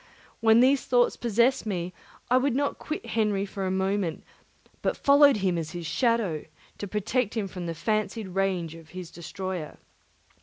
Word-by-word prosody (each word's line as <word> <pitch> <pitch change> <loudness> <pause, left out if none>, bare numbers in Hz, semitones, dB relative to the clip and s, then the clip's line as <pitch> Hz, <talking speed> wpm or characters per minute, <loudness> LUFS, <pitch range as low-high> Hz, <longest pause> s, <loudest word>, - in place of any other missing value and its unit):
When 225 +1 +5
these 265 +2 +4
thoughts 245 -1 +3
possessed 235 +1 +2
me, 180 -3 -3 0.4
I 250 - +6
would 260 -1 +1
not 285 +1 0
quit 305 -5 -5
Henry 210 -3 0
for 195 -1 -4
a - - 0
moment, 190 -2 -1 0.6
but - - 0
followed 285 -2 +6
him 185 -4 0
as 155 -2 -5
his 175 -1 -5
shadow, 225 - 0 0.3
to 205 - -4
protect 220 +3 -1
him 205 -3 -1
from 180 -2 -6
the 165 - -3
fancied 215 +2 -1
rage 185 -3 -1
of 165 -1 -13
his 180 -3 -7
destroyer. 180 -1 -6
200 Hz, 165 wpm, -27 LUFS, 180-235 Hz, 0.6 s, I